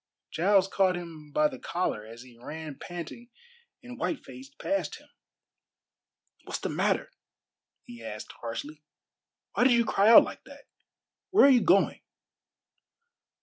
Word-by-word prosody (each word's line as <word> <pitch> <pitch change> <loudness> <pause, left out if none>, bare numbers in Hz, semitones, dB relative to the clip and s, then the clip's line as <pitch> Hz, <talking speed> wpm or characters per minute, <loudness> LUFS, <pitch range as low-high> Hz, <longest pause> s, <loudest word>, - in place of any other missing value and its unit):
Giles 190 +3 +3
caught 190 -2 +2
him 165 -4 -9
by 150 +1 +3
the 130 - -9
collar 170 -11 -2
as 115 +2 -11
he 125 -2 -17
ran 150 +2 -8
panting 175 +7 -8 0.5
and 250 +1 -10
white 300 - -3
faced 270 +3 -12
past 295 0 -2
him. - - -16 1.4
"What's - - -4
the - - -4
matter?" - - 0 0.7
he 240 -2 -12
asked 105 0 -7
harshly. 145 +6 -6 0.7
"Why - - +2
did 260 - +6
you 235 -1 +3
cry 205 0 +3
out 230 - +10
like - - -8
that? - - -14 0.7
Where 390 -4 +6
are - - +7
you 250 -3 +5
going?" 195 0 +3
185 Hz, 145 wpm, -28 LUFS, 150-240 Hz, 1.4 s, out